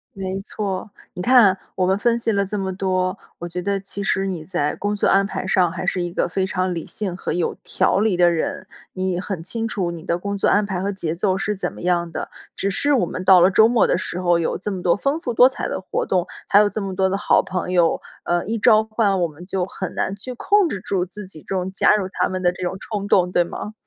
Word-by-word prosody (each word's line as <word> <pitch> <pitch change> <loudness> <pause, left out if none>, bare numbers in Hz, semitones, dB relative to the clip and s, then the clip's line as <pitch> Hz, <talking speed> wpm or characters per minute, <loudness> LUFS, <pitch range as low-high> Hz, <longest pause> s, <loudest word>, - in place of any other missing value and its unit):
没 190 0 -4
错。 200 0 -4 0.2
你 180 - -6
看 235 -5 +6 0.2
我 185 - +1
们 190 +1 +2
分 235 0 +2
析 230 -1 -1
了 200 -1 +1
这 210 +2 -4
么 190 -1 -2
多， 185 -1 0 0.2
我 175 - -6
觉 180 +1 -5
得 200 +2 -1
其 195 +1 -7
实 195 0 0
你 180 -5 -4
在 150 -3 -1
工 205 +1 -2
作 205 - +1
安 195 +1 +4
排 190 - -4
上 185 -3 +2
还 185 - -5
是 180 0 0
一 175 0 -3
个 - - 0
非 190 +2 -1
常 185 -1 -1
理 165 - -5
性 190 -4 -4
和 - - -4
有 175 -1 -1
条 - - +1
理 210 -4 +2
的 175 -1 +5
人。 275 - -3 0.3
你 185 -1 -1
很 185 -3 -5
清 225 +5 -3
楚 185 -6 -2
你 165 -1 -8
的 170 - -1
工 200 +3 -4
作 - - +1
安 205 0 +3
排 190 -3 -3
和 200 - -1
节 170 -5 -3
奏 185 +2 0
是 210 +2 -1
怎 190 - -3
么 - - -11
样 175 -1 0
的， - - -5 0.3
只 195 0 -1
是 290 +8 +1
我 235 -9 +3
们 185 - -5
到 185 -1 +7
了 180 +2 +5
周 220 +3 +6
末 235 0 +3
的 - - +2
时 180 - -4
候 175 -2 +2
有 165 - -1
这 205 +2 -4
么 185 -2 -4
多 175 - +3
丰 280 +8 0
富 245 - -3
多 250 - +8
彩 265 - -4
的 - - -3
活 185 - -3
动， 180 -2 +1 0.2
还 200 - +4
有 210 - +4
这 215 - -4
么 195 -1 -4
多 190 0 +2
的 195 - 0
好 205 - +3
朋 185 -1 -3
友， 175 -2 +2 0.2
呃， 175 0 0
一 225 +2 -1
召 220 -1 +5
唤， 215 -4 0
我 170 - +2
们 160 +3 -12
就 185 -1 -1
很 190 -1 -6
难 195 - -2
去 250 +5 -7
控 405 +9 +2
制 195 -9 -4
住 185 -2 -1
自 205 +2 -9
己 160 -5 -12
这 195 - -2
种 185 0 -2
加 195 - +3
入 200 -3 -1
他 - - 0
们 185 0 -4
的 175 -1 +3
这 180 +1 -8
种 180 +1 -2
冲 205 -1 -4
动， 180 -2 +3
对 175 - +3
吗？ 210 +4 -7
190 Hz, 290 characters per minute, -21 LUFS, 180-205 Hz, 0.3 s, 多